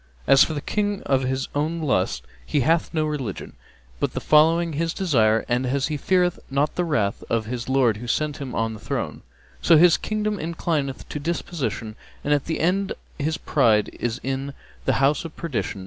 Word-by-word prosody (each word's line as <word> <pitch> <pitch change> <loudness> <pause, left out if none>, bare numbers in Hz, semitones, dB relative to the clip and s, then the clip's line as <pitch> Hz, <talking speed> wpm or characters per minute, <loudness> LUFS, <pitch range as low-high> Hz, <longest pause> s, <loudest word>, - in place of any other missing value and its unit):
As 135 - +7
for 160 - -2
the 145 - -3
King 205 +4 -1
of 135 -1 +2
his 130 +1 -1
own 155 +3 -1
lusts, 130 - 0 0.2
he 140 - 0
hath 160 +5 +2
no 155 -2 0
religion 135 -10 -4 0.5
but - - -1
the - - -2
following 165 +2 +4
his 165 +2 -1
desire 115 - +2
and, 125 +1 +1
as 135 +3 0
he 155 - -1
feareth 180 +4 +1
not 140 +2 +1
the 180 - 0
wrath 115 -12 0
of 115 -2 0
his 120 +2 -5
Lord 130 -5 +3
who 120 +3 -8
set 150 +4 0
him 135 -3 -6
on 115 0 0
the 110 - -9
throne, - - -4 0.4
so 165 - +6
his 170 +1 +6
Kingdom 215 -1 -2
inclineth 160 -4 -2
to 150 - -4
deposition 140 -9 -3 0.3
and 145 -1 +2
the 160 - -2
end 190 +4 +1
of - - -18 0.2
his 155 +3 -1
pride 115 -11 +2
is 120 0 -2
in 135 +1 -3 0.3
the - - +3
house 140 +2 +2
of 165 -2 -8
perdition. 140 -10 -3
145 Hz, 195 wpm, -23 LUFS, 125-165 Hz, 0.5 s, As